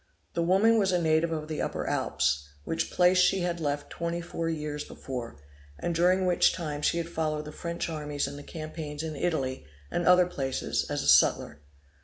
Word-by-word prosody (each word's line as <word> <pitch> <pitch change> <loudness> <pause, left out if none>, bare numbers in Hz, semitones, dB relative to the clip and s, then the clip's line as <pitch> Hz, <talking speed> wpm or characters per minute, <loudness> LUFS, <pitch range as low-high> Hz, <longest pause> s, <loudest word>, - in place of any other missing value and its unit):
The 170 - 0
woman 200 +6 +4
was 195 -2 +2
a 180 - +2
native 160 0 +2
of 155 -1 -3
the 155 -1 -3
Upper - - -2
Alps, 75 0 0 0.2
which 165 0 -2
place 180 +1 +4
she 185 +1 +4
had 175 -1 -1
left 145 -2 -2
twenty 170 0 -3
four 165 -1 -3
years 150 -2 -3
before, 120 - -7 0.4
and 170 - -2
during 180 +3 +3
which 180 -1 +4
time 150 -4 -4
she 170 - +2
had 170 -1 -2
followed 155 -2 -2
the 150 - -7
French 170 +1 -4
armies 150 -3 -2
in 140 - -7
the 145 - -8
campaigns 155 -1 -6
in 160 -1 -4
Italy, 135 -5 -1 0.3
and 175 - -1
other 180 0 +7
places, 135 -7 -2
as - - -1
a - - -3
sutler. 75 0 +4
160 Hz, 195 wpm, -28 LUFS, 150-175 Hz, 0.4 s, other